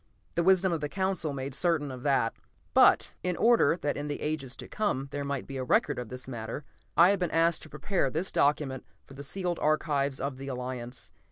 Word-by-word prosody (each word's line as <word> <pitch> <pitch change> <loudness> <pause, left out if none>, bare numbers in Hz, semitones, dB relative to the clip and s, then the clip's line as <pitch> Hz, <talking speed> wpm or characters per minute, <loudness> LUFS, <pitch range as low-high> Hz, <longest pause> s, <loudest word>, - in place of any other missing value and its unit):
The 170 - +1
wisdom 190 0 +4
of 165 -3 -1
the 150 - -2
Council 190 -3 -1
made 135 0 -4
certain 155 -2 +1
of 130 -1 -8
that. 135 -4 +2 0.4
But, - - +5
in 180 -1 -1
order 235 -7 +4
that 145 -3 -1
in 145 +1 -4
the 145 - -3
ages 145 -4 -3
to - - -9
come 140 -11 -1
there 145 - -3
might 140 -2 -3
be 135 - -6
a 130 - -2
record 125 - +2
of 120 -3 -6
this 125 0 -7
matter, 120 +3 -5 0.3
I 175 +3 +8
have 200 - 0
been 180 -2 0
asked 165 +1 +3
to 155 - -10
prepare 150 0 -1
this 165 +7 -1
document 140 -2 +1 0.2
for - - -14
the 140 +1 -8
sealed 175 +3 -3
archives 145 -3 +1
of 140 -1 -3
the 135 +1 -7
Alliance. 125 -1 -6
145 Hz, 215 wpm, -29 LUFS, 135-170 Hz, 0.4 s, I